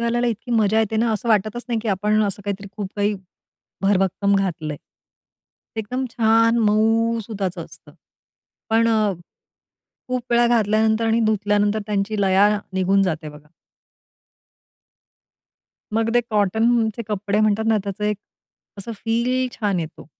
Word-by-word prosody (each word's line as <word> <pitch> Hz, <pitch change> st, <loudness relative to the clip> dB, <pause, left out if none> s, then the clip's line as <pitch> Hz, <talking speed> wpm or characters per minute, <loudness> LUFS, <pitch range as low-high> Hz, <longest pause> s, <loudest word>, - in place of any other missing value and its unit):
घालायला 235 Hz, +1 st, 0 dB
इतकी 230 Hz, +1 st, -4 dB
मजा 220 Hz, -1 st, +3 dB
येते 220 Hz, 0 st, -1 dB
ना, 230 Hz, +1 st, +2 dB
असं 230 Hz, +2 st, -3 dB
वाटतच 215 Hz, +2 st, +1 dB
नाही, 230 Hz, -2 st, 0 dB
की 225 Hz, -, -3 dB
आपण 210 Hz, +2 st, +1 dB
असं 200 Hz, 0 st, -4 dB
काहीतरी 200 Hz, 0 st, -4 dB
खूप 205 Hz, -3 st, -4 dB
काही, 205 Hz, +1 st, +1 dB, 0.7 s
भरभक्कम 195 Hz, 0 st, +2 dB
घातलंय. 160 Hz, -6 st, -2 dB, 1.0 s
एकदम 250 Hz, +5 st, -3 dB
छान, 230 Hz, 0 st, +3 dB
मऊ 225 Hz, +2 st, +2 dB
सुताच 195 Hz, -5 st, -4 dB
असतं. 165 Hz, -, -11 dB, 0.8 s
पण 225 Hz, +1 st, +3 dB
अ, 215 Hz, -3 st, +2 dB, 1.0 s
खूप 255 Hz, -1 st, -1 dB
वेळा 240 Hz, 0 st, +4 dB
घातल्यानंतर 220 Hz, -1 st, +2 dB
आणि 225 Hz, +1 st, +2 dB
धुतल्यानंतर 210 Hz, 0 st, +1 dB
त्यांची 205 Hz, 0 st, -1 dB
लया 195 Hz, +2 st, +4 dB, 0.2 s
निघून 190 Hz, +1 st, +2 dB
जाते 160 Hz, -4 st, -2 dB
बघा. 150 Hz, 0 st, -14 dB, 2.4 s
मग 225 Hz, +1 st, +1 dB
ते 240 Hz, -, +5 dB
कॉटनचे 220 Hz, +2 st, +1 dB
कपडे 205 Hz, 0 st, -1 dB
म्हणतात 215 Hz, 0 st, +2 dB
ना, 220 Hz, -1 st, +3 dB
त्याचं 200 Hz, +1 st, -4 dB
एक 210 Hz, -1 st, 0 dB, 0.6 s
असं 230 Hz, +4 st, -6 dB
फील 250 Hz, +3 st, 0 dB
छान 200 Hz, -5 st, 0 dB
येतो. 160 Hz, 0 st, -8 dB
215 Hz, 135 wpm, -21 LUFS, 200-230 Hz, 2.4 s, ते